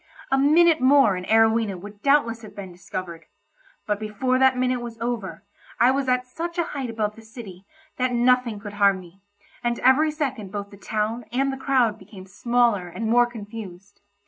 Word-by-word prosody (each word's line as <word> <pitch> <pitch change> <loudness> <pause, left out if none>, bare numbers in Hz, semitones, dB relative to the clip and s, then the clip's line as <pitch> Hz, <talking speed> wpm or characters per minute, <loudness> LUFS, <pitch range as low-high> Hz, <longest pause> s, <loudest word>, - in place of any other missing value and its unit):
A 270 - +3
minute 320 +3 +4
more 260 -6 +5
and 180 0 -6
Arowhena 220 -2 +3
would 205 +2 -12
doubtless 275 -5 +2
have 215 - -12
been 195 -2 -8
discovered, 175 -2 -8 0.6
but 210 -1 -1
before 220 +5 -1
that 265 -1 +4
minute 250 -1 0
was 235 -1 -7
over, 230 -5 -4 0.4
I 245 +2 +5
was 270 -1 -1
at 250 0 +1
such 340 +7 -6
a 340 - +2
height 275 -6 -5
above 215 -2 -2
the 225 - -13
city 220 -5 -11 0.3
that 255 0 0
nothing 245 -2 +2
could 205 0 -9
harm 200 -2 +3
me, 180 +2 -16 0.4
and 240 0 0
every 275 +5 +4
second 270 - -4
both 200 -1 -6
the - - -12
town 215 +3 -3
and 270 +2 0
the 265 0 -9
crowd 250 -6 +2
became 190 -3 -13
smaller 230 -1 +1
and 220 +6 -5
more 240 0 +5
confused. 205 -4 -10
230 Hz, 185 wpm, -23 LUFS, 205-255 Hz, 0.6 s, more